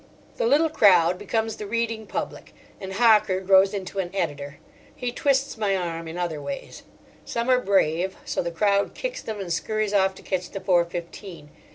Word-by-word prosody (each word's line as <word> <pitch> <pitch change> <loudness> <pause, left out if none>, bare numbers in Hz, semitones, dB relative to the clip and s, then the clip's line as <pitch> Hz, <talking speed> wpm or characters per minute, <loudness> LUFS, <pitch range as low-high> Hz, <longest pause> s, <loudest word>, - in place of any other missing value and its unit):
The 485 - +1
little 320 -4 +3
crowd 180 - +5
becomes 220 +2 -2
the 210 - -6
reading 225 0 -2
public, - - -6 0.2
and 190 0 -6
Hocker 210 -3 +4
grows 190 0 +5
into 195 -1 -5
an 180 -2 -2
editor; 145 -5 -3 0.4
he 245 -1 -3
twists 270 -2 0
my 200 -3 +1
arm 165 -2 -4
in 160 +2 -7
other 170 -4 -3
ways. 275 - -7 0.4
Some 235 +2 -1
are 250 - +5
brave, 190 -3 +1
so - - -1
the 170 - -3
crowd 200 +4 +1
kicks - - -4
them 215 -2 -6
and 180 -3 -3
scurries 215 +4 -1
off 190 -1 +2
to - - -14
catch 185 -2 -3
the 195 - -6
four 180 -3 +3
fifteen. 170 -2 -8
195 Hz, 185 wpm, -24 LUFS, 175-220 Hz, 0.4 s, crowd